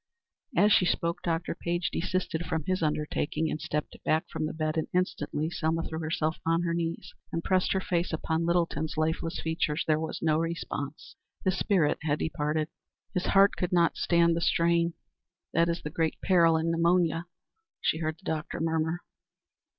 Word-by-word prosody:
As 210 +1 +6
she 180 - +4
spoke, 170 0 0
Dr. 165 0 -1
Page 175 0 -2
desisted 175 -2 -1
from 160 -2 -1
his 185 +3 -1
undertaking, 155 0 0
and 155 - -3
stepped 150 0 -3
back 155 +1 +1
from 155 - -2
the - - -3
bed, 155 0 -1
and 160 - 0
instantly 160 -3 -1
Selma 165 0 0
threw 160 -1 -4
herself 160 0 -1
on 165 +1 +2
her 170 -1 0
knees 170 -1 -3 0.2
and 165 - -2
pressed 185 -1 +2
her 190 - +1
face 175 -2 -1
upon 160 0 -1
Littleton's 165 -2 0
lifeless 160 +1 -1
features. 160 -1 -1
There 155 -1 +2
was 160 0 -4
no 155 -1 +3
response. 165 - -4 0.3
His 190 0 +2
spirit 180 -8 +2
had 150 -1 0
departed. 155 0 -1 0.4
"His 180 -2 -1
heart 195 +1 +5
could 180 - -2
not 170 -2 +3
stand 170 -1 +3
the 170 - -1
strain. 170 -1 +2 0.6
That 170 +1 +3
is 170 +1 -2
the 150 - -4
great 160 0 -1
peril 170 -3 +5
in 165 +1 0
pneumonia," 170 0 +2 0.5
she 160 - 0
heard 155 -1 -2
the 185 - -23
doctor 155 -1 -3
murmur. 160 +1 0
165 Hz, 175 wpm, -29 LUFS, 155-170 Hz, 0.6 s, As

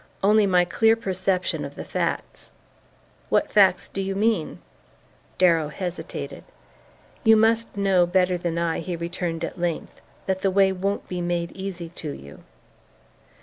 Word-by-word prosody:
"Only 210 +1 +5
my 180 -2 +4
clear 225 +5 +3
perception 190 -3 -1
of - - -7
the - - -7
facts." - - -3 0.8
"What - - +1
facts 190 -3 +4
do 195 - -4
you 195 0 -3
mean?" 210 -5 0 0.8
Darrow 165 -4 +4
hesitated. 175 +3 -6 0.8
"You 220 -2 +6
must 225 0 +2
know 190 -3 +3
better 180 0 +2
than 170 -1 -2
I," 170 -1 0
he 175 +1 -4
returned 170 0 -3
at - - -5
length, 170 -2 -3 0.2
"that 190 0 -1
the 195 - +2
way 195 0 +4
won't 195 +2 -2
be 180 -1 -4
made 175 -1 -2
easy 190 -3 -6
to 155 - -5
you." 70 - -10
185 Hz, 145 wpm, -24 LUFS, 175-195 Hz, 0.8 s, You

